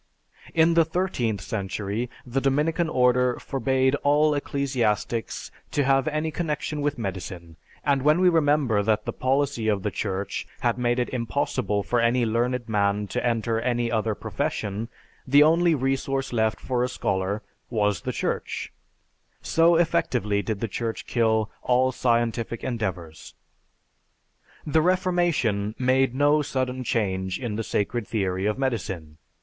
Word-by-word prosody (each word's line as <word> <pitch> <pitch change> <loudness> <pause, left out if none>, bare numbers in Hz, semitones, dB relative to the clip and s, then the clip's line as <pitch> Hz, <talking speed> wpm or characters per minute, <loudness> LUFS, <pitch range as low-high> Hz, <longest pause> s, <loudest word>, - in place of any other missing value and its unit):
In 165 +1 +5
the 165 0 +5
thirteenth 155 - -1
century, 100 +3 -3 0.2
the 130 +2 -1
Dominican 155 +5 +1
Order 125 -2 +3
forbade 130 0 0
all 150 +1 +3
ecclesiastics 125 -6 -1 0.2
to 145 - +1
have 135 +2 +2
any 155 +1 -1
connection 150 -2 -3
with 145 -1 -1
medicine; 90 -5 -6 0.3
and 140 -2 +2
when 150 +5 +4
we 185 - +5
remember 145 -9 +3
that 105 +1 +1
the - - -3
policy 130 -3 0
of 100 -3 +1
the 105 - -1
Church 100 -1 -3
had 120 0 +1
made 120 0 +1
it 125 - 0
impossible 115 -4 -1
for 120 - 0
any 120 +1 +2
learned 120 +2 0
man 105 -1 +1
to - - -2
enter 115 -1 0
any 120 -1 0
other 110 -1 0
profession, 105 +3 -3 0.4
the 140 +3 +7
only 165 +2 +4
resource 135 0 -1
left 110 -2 +1
for 125 -2 -1
a 125 - 0
scholar 100 -2 -2 0.3
was 105 -4 0
the - - -3
Church; - - -3 0.7
so 165 +1 +4
effectively 125 -11 +1
did 105 -1 -4
the 115 - 0
Church 115 +2 -4
kill 110 -2 +1
all 130 +1 +2
scientific 115 -2 0
endeavors. 95 -10 -4 1.3
The 155 +1 +3
Reformation 170 - +1
made 130 0 +2
no 145 +2 +4
sudden 130 -2 -2
change 95 -5 -1
in 120 -5 -3
the 115 - -2
sacred 105 +2 -1
theory 95 -2 -1
of 105 - 0
medicine. 95 - -3
120 Hz, 145 wpm, -25 LUFS, 105-140 Hz, 1.3 s, the